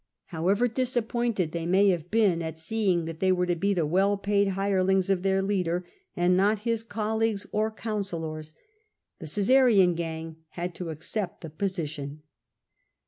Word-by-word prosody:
However 195 +9 +1
disappointed 235 -6 -1
they 170 0 -3
may 195 +3 +4
have 175 -2 -1
been 205 -6 +2
at 160 -1 -5
seeing 180 -1 0
that 165 -1 -6
they 190 0 +3
were 180 -1 +2
to 175 -1 0
be 200 +4 0
the 170 -3 +1
well 195 +6 +2
paid 200 0 +1
hirelings 190 0 +1
of 185 -2 +1
their 195 0 +1
leader, 180 -3 -1 0.3
and 175 +1 +3
not 205 +3 +2
his 230 -1 +1
colleagues 220 -1 -1
or 215 +1 +1
councillors, 170 -9 -5 0.6
the 160 - -7
Caesarian 205 - +4
gang 165 -1 -5 0.2
had 175 +1 -3
to 175 -1 -6
accept 175 +5 -4
the 160 - -8
position. 155 -5 -4
190 Hz, 155 wpm, -27 LUFS, 165-210 Hz, 0.6 s, may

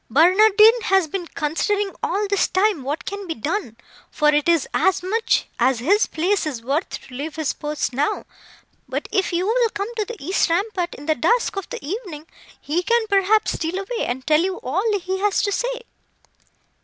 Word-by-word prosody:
"Barnardine 425 - +6
has 385 -2 +3
been 350 +2 -4
considering 390 +8 -1
all 415 +2 0
this 400 -1 +2
time 385 -4 +1
what 290 +7 -4
can 400 -1 -5
be 325 - -3
done, 285 - -3 0.3
for 300 -1 +2
it 295 +2 +2
is 335 -4 +3
as 380 -2 +2
much 445 +5 +1
as 260 -1 +3
his 385 - +2
place 360 +2 0
is 250 -6 -5
worth 285 +8 -1
to 255 - -9
leave 295 +5 -5
his 315 -3 -1
post 295 -3 -3
now. 280 +4 -1 0.6
But, - - -3
if 385 -2 +1
you 350 +1 0
will 465 +2 +2
come 410 +3 -5
to 430 - 0
the 470 +3 -8
east 355 +4 0
rampart 360 0 -1
in 290 - -11
the 315 - +2
dusk 465 - +1
of 390 -2 -5
the - - -7
evening, 345 -4 -6 0.3
he 320 +5 -1
can, 470 +4 +1
perhaps, 405 +2 +3
steal 330 +3 -3
away, 455 +5 -3
and 255 +1 -4
tell 305 0 +4
you 370 +1 -1
all 395 - 0
he 375 +1 -3
has 410 0 +1
to 405 - 0
say." - - -2
370 Hz, 190 wpm, -22 LUFS, 305-415 Hz, 0.6 s, Barnardine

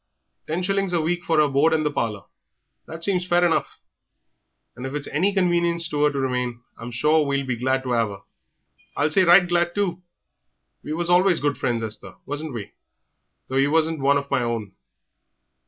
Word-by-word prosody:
Ten 165 +4 -2
shillings 195 -1 0
a 170 - +2
week 175 +2 -1
for 165 - 0
her 150 -1 +5
board 145 +4 +2
and 155 -1 +1
the 150 - +1
parlour 105 -7 -3 0.6
that 160 +1 -7
seems 185 -2 +1
fair 175 0 +3
enough; 170 - 0 1.0
and 125 - -9
if 135 - -6
it's 150 - -3
any 180 +7 +1
convenience 170 -3 +1
to 150 0 0
'er 150 - +4
to 140 - -5
remain, 125 -2 -2
I'm 115 - -8
sure 150 +6 +2
we'll 140 -1 -1
be 130 -2 -2
glad 130 +2 0
to 125 -1 -2
'ave 115 -3 +1
'er. - - -9 0.8
I'll 150 +2 +1
say 190 +3 +4
right 175 +1 +6
glad, 175 0 0
too. 185 -3 -1 0.8
We 150 - -4
was 175 +2 -1
always 180 0 +4
good 145 -1 0
friends, 120 -2 -1
Esther, 105 -4 -5
wasn't 145 -1 -5
we, 105 -4 -7 0.8
though 130 - -2
ye 135 +1 +4
wasn't 160 +1 +1
one 140 +1 +3
of 140 0 -5
my - - +2
own?" 115 -4 -3
150 Hz, 195 wpm, -23 LUFS, 130-175 Hz, 1.0 s, right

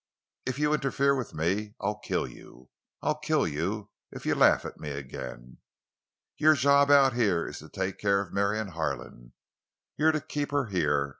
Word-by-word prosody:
If 130 0 -2
you 150 +1 +2
interfere 140 -1 +2
with 130 -4 -5
me 100 +7 -1
I'll 105 +1 -2
kill - - -1
you. 65 +1 -15 0.3
I'll 150 0 0
kill 155 -1 +1
you 95 +8 -3 0.2
if - - -10
you - - +2
laugh - - +4
at - - -8
me 75 - -5
again. 65 -3 -8 0.8
Your 155 +1 +5
job 140 0 +4
out 140 -2 +6
here 100 -8 +1
is - - -7
to 75 - -12
take 95 -1 -3
care 100 -1 +2
of 100 -2 -5
Marion 100 +1 0
Harlan. 70 -7 -5 0.6
You're 160 +1 +4
to 155 - -1
keep 145 0 -3
her 145 -2 0
here. 75 -6 +1
105 Hz, 175 wpm, -28 LUFS, -, 0.8 s, out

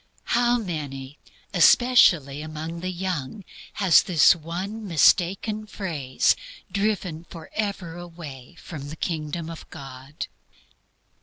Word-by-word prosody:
How 240 0 +4
many, 145 - -5 0.3
especially 170 - +5
among 155 +2 -6
the 185 +2 -3
young, 185 0 -4 0.3
has 190 -5 +5
this 170 -5 +5
one 185 +7 -5
mistaken 195 +6 +3
phrase 155 -12 0 0.4
driven 190 -5 -1
forever 175 +1 -5
away 165 -7 -10
from 145 -4 -8
the 155 - -6
kingdom 160 0 -3
of 165 -1 -9
God? 135 0 -8
170 Hz, 100 wpm, -25 LUFS, 150-195 Hz, 0.4 s, especially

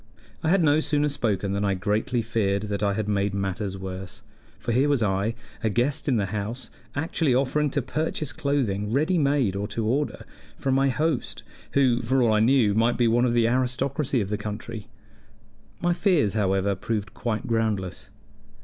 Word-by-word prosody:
I 160 - 0
had 185 0 +4
no 150 0 +4
sooner 150 -1 +1
spoken 105 -8 -1
than 100 +1 -1
I 100 -1 +1
greatly 110 +5 0
feared 100 -3 0
that 100 -2 -3
I 100 -1 +2
had 110 -1 -2
made 100 -1 0
matters 95 0 -2
worse; 95 -1 -7 0.3
for - - -3
here 130 +5 +3
was 140 -5 +2
I, 100 +3 0 0.3
a 110 - +2
guest 130 +9 0
in 130 - +3
the 100 - +1
house, 110 +5 -5 0.2
actually 145 -2 +1
offering 140 +3 +1
to 140 -1 -1
purchase 150 +1 -2
clothing 130 -10 -1
ready 155 +8 +2
made 140 -9 +2
or 100 +1 -2
to 100 - -10
to 115 - -1
order 140 +7 -1 0.3
from 135 - 0
my 135 +1 +3
host, 150 0 -1 0.3
who, 130 -3 +3
for 130 +3 +1
all 115 -2 +3
I 105 - +3
knew, 115 -2 +4
might 115 +3 +2
be 120 - +3
one 120 +2 +3
of 120 - +1
the 120 -1 +3
aristocracy 130 +2 0
of 100 - -3
the 105 0 -2
country. 105 +1 -6 0.9
My 175 0 +2
fears, 175 - +2
however, 100 -1 +1
proved 105 +2 -3
quite 110 -3 -3
groundless. 110 -5 -1
115 Hz, 185 wpm, -25 LUFS, 105-140 Hz, 0.9 s, had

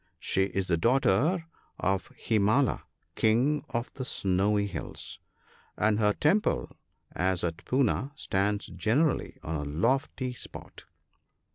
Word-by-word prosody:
She 95 - +1
is 95 -1 -2
the 85 -2 +1
daughter 135 - +2 0.3
of 95 +1 0
Himala, 110 +5 +2 0.3
King 125 +7 +2
of 115 +1 -3
the 130 - -5
Snowy 100 -2 +1
Hills; 95 -5 -6 0.6
and 105 0 +2
her 105 -1 +4
temple, 185 - +1 0.4
as 95 0 0
at 85 +1 -3
Poona, 130 +1 +1
stands 100 -6 0
generally 135 +8 0
on 80 - -3
a 75 - -3
lofty 125 - 0
spot. - - -10
110 Hz, 120 wpm, -29 LUFS, 95-130 Hz, 0.6 s, her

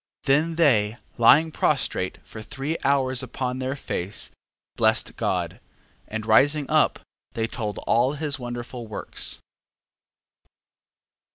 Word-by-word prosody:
12:22. - - -24
Then 150 +4 +2
they 115 -9 +3 0.2
lying 155 +7 +6
prostrate 130 -11 0
for 110 - -9
three 135 +8 -4
hours 130 -2 +2
upon 130 0 -3
their 130 +1 -2
face, 100 -6 -2 0.4
blessed - - +2
God, - - -2 0.5
and 110 0 -5
rising 140 +6 +4
up, - - +3 0.3
they 115 - -1
told 110 -2 -3
all 125 +4 +3
his 150 -1 -3
wonderful 120 -1 -6
works. 105 - -3
130 Hz, 115 wpm, -24 LUFS, 115-140 Hz, 0.5 s, lying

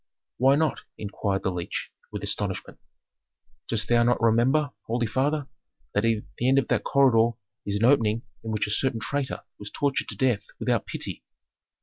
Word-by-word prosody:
"Why 135 +2 +5
not?" 155 +1 +1 0.2
inquired 100 -1 -2
the 95 - +1
leech, 85 -1 -4 0.2
with - - -5
astonishment. - - -3 0.9
"Dost 110 -2 -1
thou 120 0 +4
not 120 +1 +3
remember, 125 +6 +3 0.2
holy 120 +1 0
father, 140 +6 0 0.5
that 105 - +2
at 115 -2 +1 0.2
the 125 - +2
end 135 - +4
of 135 - +2
that - - +2
corridor 120 -4 +4 0.3
is 100 - -1
an 110 - +2
opening 115 -4 +3 0.2
in 110 - -5
which 105 -1 0
a 105 - -4
certain 125 +2 +1
traitor 140 +3 -2 0.2
was 105 - -6
tortured 140 -2 0
to - - -7
death 120 -6 +1
without - - 0
pity." - - -4
115 Hz, 175 wpm, -26 LUFS, 110-135 Hz, 0.9 s, Why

